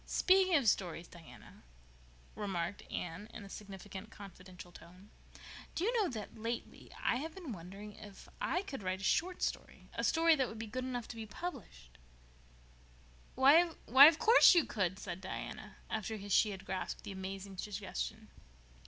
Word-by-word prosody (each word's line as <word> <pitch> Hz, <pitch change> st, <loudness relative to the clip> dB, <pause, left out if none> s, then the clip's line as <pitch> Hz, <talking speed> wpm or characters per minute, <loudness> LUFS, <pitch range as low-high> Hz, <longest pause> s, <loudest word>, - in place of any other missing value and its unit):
"Speaking 375 Hz, -1 st, +4 dB
of 275 Hz, -7 st, +3 dB
stories, 175 Hz, -4 st, +1 dB
Diana," 170 Hz, -3 st, -14 dB, 0.7 s
remarked 195 Hz, -2 st, -3 dB
Anne, 180 Hz, +4 st, -5 dB
in -, -, -7 dB
a 200 Hz, -, -11 dB
significant, 195 Hz, 0 st, -9 dB
confidential 185 Hz, -3 st, -12 dB
tone, 180 Hz, +4 st, -15 dB, 0.6 s
"do 335 Hz, -, -1 dB
you 460 Hz, +5 st, +1 dB
know 435 Hz, -6 st, +2 dB
that 215 Hz, -5 st, -7 dB
lately 230 Hz, +2 st, -5 dB
I 240 Hz, -, +2 dB
have 315 Hz, +6 st, -5 dB
been 350 Hz, -8 st, -7 dB
wondering 195 Hz, +4 st, -9 dB
if 205 Hz, -1 st, -12 dB
I 360 Hz, -, 0 dB
could 275 Hz, -, -7 dB
write 185 Hz, 0 st, -2 dB
a -, -, -8 dB
short 360 Hz, -, +1 dB
story—a -, -, -4 dB
story 330 Hz, 0 st, +4 dB
that 265 Hz, -4 st, +1 dB
would 225 Hz, -, -8 dB
be 225 Hz, -, -5 dB
good 255 Hz, +4 st, -4 dB
enough 245 Hz, -2 st, -4 dB
to -, -, -7 dB
be 225 Hz, -1 st, -7 dB
published?" 115 Hz, -, -8 dB, 1.4 s
"Why, 275 Hz, +5 st, +7 dB, 0.3 s
of 280 Hz, +6 st, +9 dB
course 450 Hz, 0 st, +7 dB
you 335 Hz, -6 st, +5 dB
could," 190 Hz, -5 st, -1 dB
said 185 Hz, -, -6 dB
Diana, 210 Hz, +2 st, -7 dB
after 220 Hz, 0 st, -3 dB
she 210 Hz, +2 st, +4 dB
had 195 Hz, -2 st, -7 dB
grasped 190 Hz, 0 st, -4 dB
the 205 Hz, -, -6 dB
amazing 195 Hz, 0 st, -6 dB
suggestion. 210 Hz, +2 st, -5 dB
210 Hz, 160 wpm, -34 LUFS, 190-265 Hz, 1.4 s, of